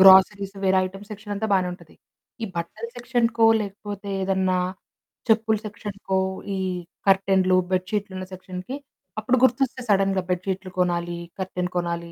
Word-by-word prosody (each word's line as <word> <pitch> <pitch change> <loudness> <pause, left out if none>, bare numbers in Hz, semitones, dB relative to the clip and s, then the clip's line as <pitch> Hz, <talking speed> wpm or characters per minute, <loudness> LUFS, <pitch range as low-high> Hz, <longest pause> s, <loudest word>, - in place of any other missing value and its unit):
Groceries 195 +1 +7
వేరే 190 0 +4
items 195 +3 -10
section 210 0 -7
అంతా 220 +2 -1
బానే 185 -2 +3
ఉంటది. 180 - -13 0.5
ఈ - - +1
బట్టల 215 +7 -4
సెక్షన్‌కో 235 -2 +2
లేకపోతే 205 0 -6
ఏదన్నా 190 -1 +2 0.7
చెప్పుల 220 0 +4
సెక్షన్‌కో 200 -2 -3 0.4
ఈ - - -2 0.5
కర్టెన్లు, 190 -1 +4
బెడ్ 185 0 +1
షీట్లున్న 195 -3 -2
సెక్షన్‌కి 185 +5 -6 0.4
అప్పుడు 245 +4 +2
గుర్తొస్తే 260 0 +3
సడెన్‌గా 195 -1 +3
బెడ్ 180 +1 0
షీట్లు 190 0 -2
కొనాలి, 175 -1 0 0.2
కర్టెన్ 180 -1 -2
కొనాలి. 170 -1 -2
195 Hz, 135 wpm, -25 LUFS, 185-210 Hz, 0.7 s, Groceries